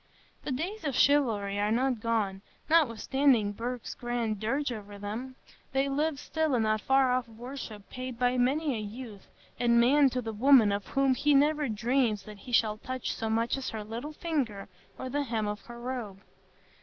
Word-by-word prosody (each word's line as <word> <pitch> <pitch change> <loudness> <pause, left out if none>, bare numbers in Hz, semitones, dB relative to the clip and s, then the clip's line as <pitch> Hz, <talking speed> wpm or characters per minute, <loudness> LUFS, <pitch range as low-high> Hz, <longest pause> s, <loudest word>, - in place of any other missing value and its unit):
The - - -4
days 345 +11 -3
of 280 -5 -2
chivalry 220 -9 +3
are 205 +1 +1
not 250 +1 +1
gone, 215 -4 -1 0.3
notwithstanding 265 -6 +3
Burke's 240 +3 -5
grand 235 -3 -2
dirge 265 +6 -1
over 205 -3 -7
them; 220 +6 -5 0.4
they 270 +1 +2
live 290 +1 0
still 315 -2 0
in 230 - +2
that 215 0 +1
far 265 -1 +3
off 250 0 0
worship 230 -2 -8
paid 255 -1 -6
by 245 +1 +2
many 275 +4 +1
a 225 - -3
youth 215 -1 -8 0.3
and 235 -1 +4
man 275 +4 +5
to 255 - -2
the 225 -2 -4
woman 235 -1 +6
of 200 -1 -2
whom 270 -1 +2
he 290 +3 +2
never 295 0 +3
dreams 230 -1 +1
that 210 0 -11
he 250 - -10
shall 215 -2 +2
touch 255 +1 -4
so 225 - -3
much 230 +1 +1
as 265 -1 -4
her 220 -1 -5
little 235 +8 -6
finger 275 -12 -2 0.3
or 260 - -5
the 285 +3 -1
hem 225 -6 -1
of 210 0 -4
her 240 0 -9
robe. 240 -6 -5
245 Hz, 185 wpm, -29 LUFS, 215-270 Hz, 0.4 s, woman